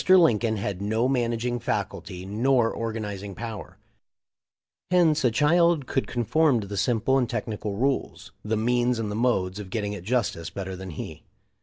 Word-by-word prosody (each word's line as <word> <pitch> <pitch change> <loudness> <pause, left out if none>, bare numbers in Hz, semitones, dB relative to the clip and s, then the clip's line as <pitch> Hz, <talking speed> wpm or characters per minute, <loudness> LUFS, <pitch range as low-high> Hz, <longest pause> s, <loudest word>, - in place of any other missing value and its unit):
Lin 165 - +6
coln 110 -1 0
had 100 -1 -3
no 110 +4 +1
managing 120 -1 0
faculty 90 -4 -3
nor 115 +3 +2
organizing 105 -4 -4
power; 115 -3 -7 1.1
hence 170 -5 +4
a 125 - +5
child 160 +4 +3
could 135 - -1
conform 130 +3 +2
to 105 - -5
the 100 +1 -6
simple 120 +5 +2
and 125 - 0
tech 115 -4 -2
nical 105 -2 -4
rules, 135 +1 -1
the 110 +1 -1
means 120 +2 +2
and 110 -2 -2
the - - -3
modes 105 -5 +1
of 100 -2 -7
getting 105 0 -2
at 105 - -6
justice 105 -7 -1
better 95 -1 -5
than 95 +1 -8
he. 80 - -7
115 Hz, 170 wpm, -26 LUFS, 105-125 Hz, 1.1 s, Lin